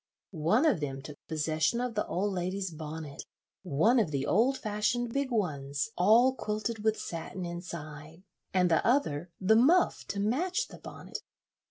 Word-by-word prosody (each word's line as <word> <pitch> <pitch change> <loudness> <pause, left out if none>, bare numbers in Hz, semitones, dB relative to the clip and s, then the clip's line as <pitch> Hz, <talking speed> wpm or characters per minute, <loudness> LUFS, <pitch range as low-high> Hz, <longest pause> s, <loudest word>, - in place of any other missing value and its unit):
One 185 - +2
of 280 - +3
them 135 -2 -4
took 145 +1 -10
possession 160 +7 0
of 250 -1 -2
the 210 - -1
old 200 +3 -1
lady's 185 +1 -2
bonnet, 155 -2 -7 0.4
one 185 - +3
of 205 -8 +1
the 140 -2 -1
old 240 - +3
fashioned 225 +3 -1
big 275 -1 0
ones, 145 - -1
all 225 +8 +5
quilted 215 -2 -3
with 220 0 +2
satin 175 +2 -5
inside; 165 -2 -8 0.3
and 180 -2 +2
the 160 - +3
other 175 - +1
the 200 +3 +4
muff 315 +11 +4
to 200 - -3
match 350 - 0
the - - -12
bonnet. - - -8
190 Hz, 160 wpm, -30 LUFS, 155-230 Hz, 0.4 s, all